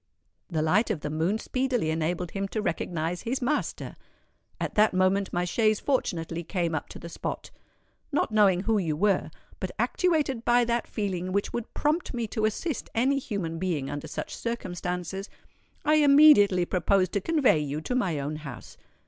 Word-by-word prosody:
The 160 Hz, -4 st, 0 dB
light 195 Hz, +10 st, +2 dB
of 190 Hz, -9 st, -2 dB
the 150 Hz, -, -4 dB
moon 165 Hz, +7 st, 0 dB
speedily 250 Hz, -7 st, -1 dB
enabled 165 Hz, +2 st, -2 dB
him 195 Hz, 0 st, -2 dB
to 205 Hz, +3 st, -3 dB
recognise 170 Hz, 0 st, -2 dB
his 250 Hz, +3 st, -2 dB
master. 285 Hz, +4 st, -2 dB, 0.6 s
At -, -, -3 dB
that 215 Hz, -3 st, +3 dB
moment 185 Hz, +1 st, +2 dB
my 175 Hz, 0 st, 0 dB
chaise 215 Hz, +3 st, +2 dB
fortunately 170 Hz, -, -1 dB
came 170 Hz, -1 st, -2 dB
up 155 Hz, -, -3 dB
to -, -, -9 dB
the 170 Hz, -, -9 dB
spot. 170 Hz, -, -5 dB, 0.6 s
Not 285 Hz, -, 0 dB
knowing 200 Hz, -4 st, +4 dB
who 220 Hz, +1 st, +1 dB
you 160 Hz, -5 st, -1 dB
were, 200 Hz, +1 st, +2 dB, 0.3 s
but -, -, -3 dB
actuated 300 Hz, -10 st, +1 dB
by 240 Hz, 0 st, +4 dB
that 235 Hz, 0 st, -1 dB
feeling 185 Hz, -3 st, -3 dB
which 200 Hz, +1 st, -1 dB
would 235 Hz, -1 st, -4 dB
prompt 300 Hz, -1 st, 0 dB
me 235 Hz, -1 st, -1 dB
to 215 Hz, -1 st, 0 dB
assist 265 Hz, -, -2 dB
any 265 Hz, +4 st, +2 dB
human 185 Hz, -10 st, -4 dB
being 165 Hz, -7 st, -2 dB
under 145 Hz, +2 st, -5 dB
such -, -, -5 dB
circumstances, 180 Hz, -3 st, -4 dB, 0.6 s
I 305 Hz, +1 st, +4 dB
immediately 280 Hz, -11 st, +6 dB
proposed 185 Hz, +1 st, +1 dB
to 200 Hz, -, -1 dB
convey 295 Hz, -, +3 dB
you 150 Hz, 0 st, -3 dB
to 250 Hz, -, -3 dB
my 195 Hz, -11 st, 0 dB
own 145 Hz, +2 st, -3 dB
house. 140 Hz, -6 st, -10 dB
195 Hz, 175 wpm, -27 LUFS, 170-235 Hz, 0.6 s, immediately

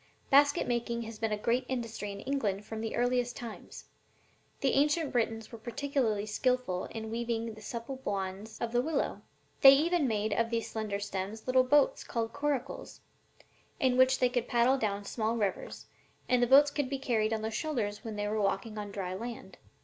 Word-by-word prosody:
"Basket 285 Hz, +1 st, +5 dB
making 235 Hz, -1 st, -1 dB
has 225 Hz, -1 st, -8 dB
been 225 Hz, -1 st, -1 dB
a 210 Hz, -, 0 dB
great 235 Hz, +4 st, +1 dB
industry 230 Hz, -5 st, -4 dB
in 200 Hz, 0 st, -8 dB
England 210 Hz, -8 st, -1 dB
from 220 Hz, 0 st, -5 dB
the 225 Hz, -, -3 dB
earliest 245 Hz, 0 st, +1 dB
times; 230 Hz, -3 st, -9 dB, 0.8 s
the 270 Hz, -, +3 dB
ancient 295 Hz, +2 st, +2 dB
Britons 225 Hz, -2 st, -1 dB
were 230 Hz, -, -9 dB
particularly 240 Hz, -3 st, -1 dB
skillful 215 Hz, -3 st, 0 dB
in 220 Hz, -1 st, -6 dB
weaving 230 Hz, -1 st, -2 dB
the 215 Hz, -, -13 dB
supple 235 Hz, +4 st, -6 dB
wands 195 Hz, +2 st, -4 dB
of 235 Hz, -, -2 dB
the 245 Hz, 0 st, +2 dB
willow. 300 Hz, +1 st, -1 dB, 0.4 s
They 270 Hz, 0 st, +11 dB
even 325 Hz, 0 st, +2 dB
made 215 Hz, -2 st, 0 dB
of 230 Hz, +2 st, +1 dB
these 230 Hz, -1 st, -2 dB
slender 215 Hz, -2 st, -3 dB
stems 205 Hz, +2 st, -4 dB
little 255 Hz, 0 st, +4 dB
boats 285 Hz, +2 st, +3 dB
called 230 Hz, -1 st, -3 dB
'coracles,' 285 Hz, -2 st, -3 dB, 0.8 s
in 260 Hz, -5 st, +3 dB
which 260 Hz, +1 st, +5 dB
they 250 Hz, -, +3 dB
could 245 Hz, -1 st, -1 dB
paddle 245 Hz, +3 st, +3 dB
down 205 Hz, -3 st, -1 dB
the -, -, -11 dB
small 225 Hz, 0 st, -1 dB
rivers, 200 Hz, -4 st, -3 dB, 0.4 s
and 250 Hz, -1 st, +3 dB
the 245 Hz, -, +4 dB
boats 285 Hz, +3 st, +7 dB
could 285 Hz, -3 st, -1 dB
be 275 Hz, -, -2 dB
carried 225 Hz, -5 st, 0 dB
on 220 Hz, -1 st, -1 dB
their 220 Hz, -, -2 dB
shoulders 220 Hz, -5 st, -2 dB
when 220 Hz, -2 st, -5 dB
they 205 Hz, 0 st, -2 dB
were 215 Hz, +1 st, 0 dB
walking 210 Hz, +2 st, -1 dB
on 205 Hz, -1 st, -5 dB
dry 190 Hz, -2 st, -4 dB
land." 220 Hz, -2 st, -7 dB
230 Hz, 190 wpm, -31 LUFS, 215-260 Hz, 0.8 s, They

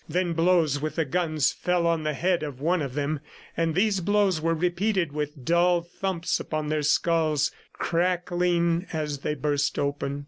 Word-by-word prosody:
Then 180 Hz, -1 st, 0 dB
blows 165 Hz, -4 st, +2 dB
with 155 Hz, 0 st, -3 dB
the 160 Hz, -, +1 dB
guns 155 Hz, -2 st, +1 dB
fell 180 Hz, -1 st, 0 dB
on 165 Hz, -1 st, +2 dB
the 155 Hz, -1 st, -2 dB
head 175 Hz, +4 st, +1 dB
of 145 Hz, -4 st, -5 dB
one 170 Hz, +4 st, +1 dB
of 135 Hz, -3 st, -4 dB
them... 145 Hz, +1 st, -1 dB, 0.4 s
and 165 Hz, -1 st, 0 dB
these 200 Hz, +1 st, +2 dB
blows 200 Hz, -3 st, +2 dB
were 165 Hz, +1 st, +1 dB
repeated 180 Hz, +1 st, 0 dB
with 150 Hz, -2 st, -5 dB
dull 175 Hz, +1 st, +3 dB
thumps 180 Hz, 0 st, -2 dB
upon 155 Hz, -1 st, -3 dB
their 155 Hz, 0 st, 0 dB
skulls, 155 Hz, -1 st, +2 dB, 0.2 s
crackling 175 Hz, 0 st, 0 dB
as 150 Hz, -3 st, -3 dB
they 150 Hz, -, -2 dB
burst 145 Hz, 0 st, 0 dB
open. 140 Hz, 0 st, -2 dB
165 Hz, 170 wpm, -26 LUFS, 150-175 Hz, 0.4 s, dull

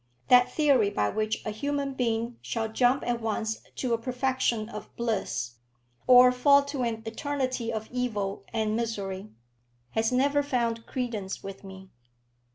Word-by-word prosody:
That 250 Hz, 0 st, +6 dB
theory 275 Hz, -9 st, +3 dB
by 105 Hz, -, 0 dB
which 215 Hz, 0 st, -2 dB
a 215 Hz, -, -2 dB
human 280 Hz, +5 st, -2 dB
being 235 Hz, -2 st, -1 dB
shall 225 Hz, -1 st, -2 dB
jump 245 Hz, +4 st, +2 dB
at 240 Hz, -1 st, -1 dB
once 220 Hz, 0 st, -2 dB
to 250 Hz, -3 st, -1 dB
a 230 Hz, -, +1 dB
perfection 250 Hz, -2 st, 0 dB
of 210 Hz, -2 st, -8 dB
bliss, 195 Hz, -, -2 dB, 0.5 s
or 250 Hz, 0 st, +8 dB
fall 280 Hz, +3 st, +5 dB
to 280 Hz, -1 st, -4 dB
an 225 Hz, -2 st, -2 dB
eternity 255 Hz, 0 st, -2 dB
of 220 Hz, -1 st, -4 dB
evil 215 Hz, -6 st, -2 dB
and 220 Hz, -1 st, 0 dB
misery, 205 Hz, -4 st, -3 dB, 0.6 s
has 225 Hz, +1 st, +1 dB
never 280 Hz, +3 st, +3 dB
found 235 Hz, -5 st, -1 dB
credence 225 Hz, -7 st, -4 dB
with 195 Hz, 0 st, -8 dB
me. 190 Hz, -1 st, -11 dB
230 Hz, 150 wpm, -28 LUFS, 215-255 Hz, 0.6 s, or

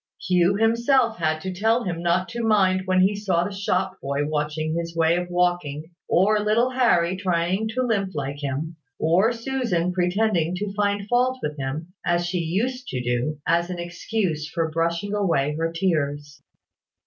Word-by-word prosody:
Hugh 180 Hz, +1 st, +2 dB
himself 230 Hz, +2 st, +2 dB
had 155 Hz, -1 st, 0 dB
to 185 Hz, +1 st, -4 dB
tell 225 Hz, +6 st, +1 dB
him 170 Hz, -3 st, -3 dB
not 175 Hz, +2 st, +1 dB
to 235 Hz, -, -4 dB
mind 190 Hz, -4 st, +2 dB
when 185 Hz, 0 st, +3 dB
he 195 Hz, +2 st, +3 dB
saw 190 Hz, -4 st, 0 dB
the 200 Hz, -, -4 dB
shop 190 Hz, -1 st, -1 dB
boy 140 Hz, +1 st, -1 dB
watching 155 Hz, +1 st, -2 dB
his 170 Hz, 0 st, -4 dB
way 165 Hz, 0 st, +3 dB
of 180 Hz, 0 st, -2 dB
walking, 175 Hz, -3 st, -1 dB, 0.2 s
or 210 Hz, +4 st, +3 dB
little 220 Hz, +4 st, +2 dB
Harry 190 Hz, -9 st, +2 dB
trying 185 Hz, +2 st, 0 dB
to 255 Hz, -, +1 dB
limp 200 Hz, -7 st, -1 dB
like 140 Hz, 0 st, -3 dB
him, 145 Hz, +4 st, -3 dB, 0.2 s
or 180 Hz, +8 st, +3 dB
Susan 230 Hz, -8 st, -1 dB
pretending 180 Hz, -1 st, +1 dB
to 195 Hz, +1 st, -4 dB
find 205 Hz, 0 st, 0 dB
fault 250 Hz, +3 st, +2 dB
with 150 Hz, 0 st, -2 dB
him, 150 Hz, +6 st, -4 dB
as 175 Hz, 0 st, +1 dB
she 175 Hz, +1 st, -1 dB
used 230 Hz, +10 st, -2 dB
to 130 Hz, -, -3 dB
do, 120 Hz, +5 st, -1 dB
as 170 Hz, +2 st, +1 dB
an 180 Hz, -, -4 dB
excuse 175 Hz, -2 st, -2 dB
for 165 Hz, -2 st, -2 dB
brushing 170 Hz, +5 st, -1 dB
away 165 Hz, -8 st, +1 dB
her 165 Hz, +1 st, -1 dB
tears. 145 Hz, -4 st, -2 dB
180 Hz, 170 wpm, -24 LUFS, 160-205 Hz, 0.2 s, when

